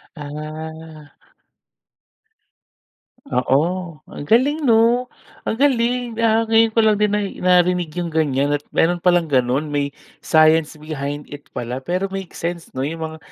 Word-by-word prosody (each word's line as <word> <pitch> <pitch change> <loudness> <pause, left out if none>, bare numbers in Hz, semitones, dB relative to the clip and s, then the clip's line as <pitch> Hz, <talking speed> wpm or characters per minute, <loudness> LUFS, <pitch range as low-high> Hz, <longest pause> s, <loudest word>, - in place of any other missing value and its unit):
Ah. 155 0 -8 2.2
Oo 135 +3 +3 0.5
ang - - -7
galing 280 +7 +4
'no, 235 +2 +4 0.4
ang - - 0
galing, 250 -3 +2 0.3
ah, 220 0 +3
ngayon 225 0 +4
ko - - +4
lang 215 -2 +4
din 210 -1 +2
nai 205 -1 0 0.2
narinig 180 -2 +3
yung 170 -2 -3
ganyan 140 -2 +1
at 145 - -6
meron 175 +1 +2
palang 175 -2 +4
ganun 130 +3 +2
may 145 -1 +1 0.5
science 155 0 +5
behind 145 -1 -4
it 145 - -13
pala. 120 +1 -4
Pero 185 +2 -1
makes 195 -2 -6
sense 170 0 -3
no 130 - -2
yung 165 +3 -4
mga 160 0 -8
165 Hz, 140 wpm, -20 LUFS, 150-210 Hz, 2.2 s, science